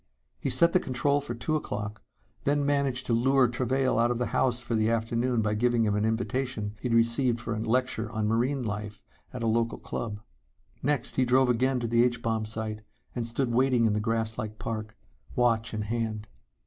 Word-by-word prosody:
He - - -2
set 170 0 +4
the 185 - +5
control 140 0 0
for 130 -4 -5
two 120 +7 -1
o'clock, 105 -7 -4 0.4
then 145 0 +1
managed 140 -3 +1
to 120 - 0
lure 130 +2 +4
Travail 130 +2 0
out 120 +1 +3
of 120 - 0
the 125 - 0
house 125 -2 +2
for 120 -1 -5
the 110 0 +2
afternoon 115 +1 0
by 105 0 0
giving 120 +1 +2
him 105 - +1
an 105 +1 +1
invitation 110 -1 -2
he'd 120 -2 0
received 115 +1 +2
for 115 -1 -3
a 110 - -3
lecture 115 0 0
on 110 -2 -1
marine 125 +5 +1
life 105 -1 -5 0.3
at 125 -2 -5
a - - 0
local 115 +1 +1
club. 105 -3 -5 0.6
Next, 140 -2 0
he 130 - +4
drove 130 +1 +3
again 130 +2 +2
to 120 - -1
the 115 +1 +4
H 120 -1 0
bomb 110 -1 0
site 110 0 -4 0.3
and 120 -2 -2
stood 120 +1 -1
waiting 125 -1 +3
in 110 - +3
the 105 - 0
grass 110 0 -1
like 110 0 -5
park, 110 0 -5 0.4
watch 115 -2 +2
in 110 -1 -3
hand. 110 -1 -3
115 Hz, 200 wpm, -28 LUFS, 110-125 Hz, 0.6 s, the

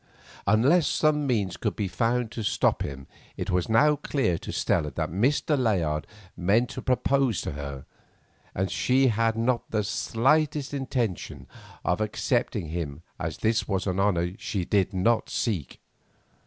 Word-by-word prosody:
Unless 135 - +4
some 150 -2 +2
means 100 -8 0
could - - -2
be 105 - -1
found 115 +5 0
to 115 - -5
stop 105 - +1
him 70 -1 -5 0.3
it - - -3
was 90 +1 0
now 150 +7 +5
clear 135 - -1
to - - -6
Stella 80 -4 0
that 70 - -3
Mr. 135 - +2
Layard 90 - 0 0.3
meant 105 +7 +2
to 130 - -6
propose 130 -3 +1
to - - -4
her, 70 -2 -6 0.7
and 95 - +1
as 95 - -6
she 130 +1 +3
had 115 0 +1
not 120 +1 0
the 110 -1 0
slightest 140 +7 +1
intention 125 - -3 0.4
of - - +1
accepting 105 -6 -1
him 80 -2 -4 0.4
this 110 0 +1
was 95 -2 -1
an 95 -1 -1
honour 95 -3 +2
which 90 +5 -8
she 95 -4 -2
did 100 -1 +2
not 110 +5 +1
seek. 95 - -2
110 Hz, 155 wpm, -26 LUFS, 90-125 Hz, 0.7 s, now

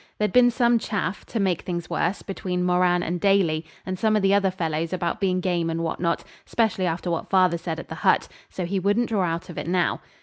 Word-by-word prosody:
There'd 210 0 0
been 250 -1 +6
some 240 0 +3
chaff, 200 -3 -3
to 230 - -3
make 185 -4 +1
things 175 -2 -4
worse, 180 +4 -1
between 180 -2 -3
Moran 180 0 +3
and 175 0 -3
Daly 170 -6 +2 0.2
and 185 -1 -4
some 220 -1 +2
of 210 - +1
the 195 0 +4
other 200 -1 +3
fellows 165 -2 -2
about 175 -2 -2
being 185 -2 +1
game 175 -2 0
and 165 0 -2
what 165 - -3
not, 170 -1 0 0.2
specially 220 -5 0
after 175 +1 -2
what 165 - -3
father 185 -3 +3
said 165 -1 -4
at - - -9
the - - -6
hut, 190 - +3 0.2
so 185 - -4
he 195 +3 -1
wouldn't 205 +5 +1
draw 210 -4 +1
out 165 0 -3
of - - -6
it - - -5
now. 175 -1 +1
180 Hz, 235 wpm, -24 LUFS, 170-200 Hz, 0.2 s, been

